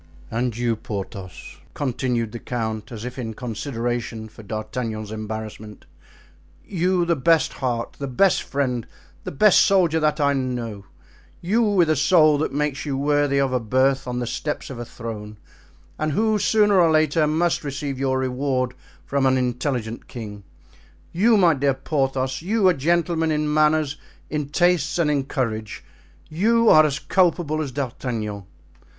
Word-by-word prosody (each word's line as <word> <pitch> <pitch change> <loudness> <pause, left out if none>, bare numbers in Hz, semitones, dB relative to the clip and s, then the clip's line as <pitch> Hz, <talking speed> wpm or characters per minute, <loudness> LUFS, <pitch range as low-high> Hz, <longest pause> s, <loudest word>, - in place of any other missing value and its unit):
"And 115 0 -1
you, 120 -1 0
Porthos," 95 -5 -7 0.2
continued 125 -4 -1
the 120 - -6
count, 110 -3 -4
as 115 -1 -7
if 125 +1 -6
in 110 -3 -5
consideration 115 -1 -4
for 110 - -13
D'Artagnan's 110 0 -5
embarrassment, 110 -1 -7 0.8
"you, 180 -1 +1
the 170 0 +2
best 160 +1 +2
heart, 120 -3 -3
the 140 - -3
best 175 +9 +3
friend, 125 -4 -2 0.4
the - - -4
best 195 +7 +5
soldier 175 -5 +3
that 155 0 +1
I 140 -1 +3
know—you, 125 - -4
with 200 -6 +3
a 155 - +2
soul 155 -1 +4
that 155 - -1
makes 145 0 -1
you 140 -3 -2
worthy 145 0 +1
of 135 -2 +1
a 125 - +2
birth 130 +4 +1
on 125 0 -3
the 125 - -2
steps 150 +4 -4
of 125 - -7
a 120 - -5
throne, 110 -3 -8 0.6
and 155 -1 -1
who, 215 +4 +2
sooner 205 -2 +4
or 165 - +4
later, 155 0 +3
must 165 +3 +1
receive 140 -1 -4
your 130 -1 +1
reward 130 -1 -1 0.3
from 140 -1 +1
an 130 0 +3
intelligent 125 -2 -2
king—you, 105 - -3
my 175 -4 +5
dear 140 -1 +1
Porthos, 135 -2 -1
you, 200 +3 +2
a - - +4
gentleman 165 +2 +1
in 150 -1 0
manners, 155 -1 +2 0.3
in 150 -2 -2
tastes 175 -1 +2
and 160 -3 +2
in 140 -2 0
courage, 110 -6 -3 0.4
you 225 +7 +3
are 155 0 +7
as 140 -1 -2
culpable 170 -3 +1
as 145 -4 -4
D'Artagnan." 115 -6 -4
135 Hz, 155 wpm, -23 LUFS, 120-155 Hz, 0.8 s, are